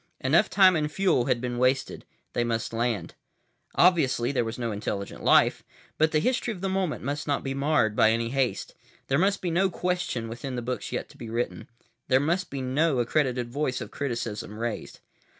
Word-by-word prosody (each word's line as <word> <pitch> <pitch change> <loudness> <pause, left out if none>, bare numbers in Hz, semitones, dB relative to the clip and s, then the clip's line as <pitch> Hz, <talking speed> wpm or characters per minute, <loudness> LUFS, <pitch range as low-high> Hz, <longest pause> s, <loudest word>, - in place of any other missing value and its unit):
Enough - - +3
time 190 -2 +6
and 150 -1 0
fuel 185 -9 +2
had 120 - +1
been 120 0 -3
wasted. 130 +2 0 0.3
They 120 - +1
must 115 -1 -2
land. 115 -6 -1 0.6
Obviously 140 -8 +3
there 130 - +1
was 115 0 -5
no 120 -2 -2
intelligent 100 -1 -4
life. - - +4 0.4
But 155 +1 +4
the 155 - +2
history 245 +7 0
of 190 -5 -7
the 195 - -1
moment 190 -4 -1
must 145 +3 -3
not 145 - 0
be 135 - -2
marred 140 -6 +1
by 110 - +5
any 115 +1 0
haste. 130 -6 -1 0.4
There 135 +2 +3
must 195 +2 +1
be 175 - 0
no 190 +3 +2
question 180 -10 -2
within 120 +3 -6
the 120 - -3
books 125 +2 -4
yet - - -3
to - - -17
be 115 - -8
written. 115 +2 -3 0.4
There 130 - +4
must 170 +6 0
be 135 -1 -4
no 140 +3 +1
accredited 125 -1 0
voice 135 -2 -1
of 120 -4 -7
criticism 115 -6 -4
raised. 115 0 -5
130 Hz, 195 wpm, -27 LUFS, 120-155 Hz, 0.6 s, time